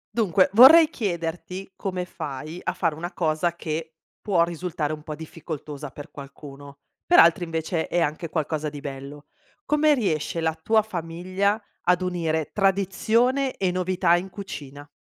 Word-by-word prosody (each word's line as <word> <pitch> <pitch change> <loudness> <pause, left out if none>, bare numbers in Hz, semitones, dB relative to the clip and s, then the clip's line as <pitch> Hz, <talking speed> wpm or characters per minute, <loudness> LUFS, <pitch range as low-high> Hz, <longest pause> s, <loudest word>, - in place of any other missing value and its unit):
Dunque 195 -4 +3
vorrei 305 +8 +9
chiederti, 180 - -4
come 185 -2 -3
fai 155 +1 -7
a - - -1
fare 165 -4 0
una 170 +4 -6
cosa 165 0 0
che 160 -1 -5 0.3
può 185 -6 +2
risultare 170 -3 -3
un 155 - -7
po' 155 0 -6
difficoltosa 150 -2 -7
per 145 +2 -11
qualcuno, 140 0 -11 0.2
per 350 - +4
altri 170 +1 +6
invece 165 0 -2
è 175 - 0
anche 165 +1 -1
qualcosa 155 -1 -2
di 145 0 -8
bello. 140 +1 -8 0.4
Come 300 0 +3
riesce 165 - -1
la 160 -1 0
tua 215 +7 +2
famiglia 185 +2 -2 0.3
ad 180 +1 +3
unire 165 -4 -1
tradizione 220 +7 +1
e 185 -2 0
novità 180 -1 +2
in 180 +2 -3
cucina? 145 -7 -9
170 Hz, 150 wpm, -24 LUFS, 155-190 Hz, 0.4 s, vorrei